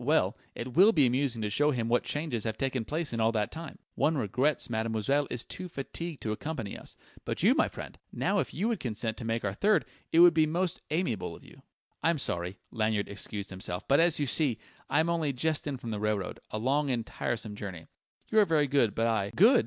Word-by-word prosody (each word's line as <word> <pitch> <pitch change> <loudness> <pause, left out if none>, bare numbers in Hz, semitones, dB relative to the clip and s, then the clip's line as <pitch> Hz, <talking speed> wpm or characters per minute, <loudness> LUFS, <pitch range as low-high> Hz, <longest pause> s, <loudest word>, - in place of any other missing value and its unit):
Well, - - +2 0.2
it 125 +1 -5
will 200 - +7
be 145 -5 +5
amusing 125 -2 0
to 105 - -1
show 145 +7 +3
him 120 -6 0
what 120 +1 +3
changes 145 -7 -2
have 110 -1 -2
taken 130 -3 -1
place 155 0 -2
in 115 - -2
all 110 0 +3
that 105 -2 0
time. 165 -2 -7 0.2
One 160 0 +1
regrets 130 +5 +1
mademoiselle 115 +5 0
is 120 - -3
too 185 - -5
fatigued 165 +2 -5
to 110 - -1
accompany 115 -2 -4
us. - - -7 0.3
But - - -3
you, - - +6
my - - +3
friend - - -9
now - - +1
if - - -1
you 200 +7 -1
would 230 -2 0
consent 110 -2 -2
to 115 - -5
make 115 -1 -1
our 100 - -1
third, 210 - +3 0.3
it - - +2
would 175 0 +9
be 160 -1 +4
most 175 +3 -1
amiable 155 - -1
of - - -15
you." - - -16 0.4
"I'm 165 0 +2
sorry," 90 -7 -2
Lanyard 110 -3 0
excused 100 0 -4
himself; 90 -1 -4
"but 140 - +5
as 170 -2 +4
you 145 - +1
see, 135 -3 +2 0.3
I 145 - +4
am 160 - 0
only 160 -4 0
just 155 +4 0
in 140 -2 -2
from 115 -2 -6
the 105 - -3
railroad, 105 -3 -1
a - - -3
long 140 +6 +1
and 120 -3 -1
tiresome 110 -4 -3
journey. 95 -6 -7 0.4
You 220 - +4
are 210 - +6
very 155 -4 +3
good, 135 -6 +2
but 115 - +1
I 110 -4 +1
" - - -15
"Good!" 235 +7 +7
130 Hz, 230 wpm, -30 LUFS, 110-155 Hz, 0.4 s, would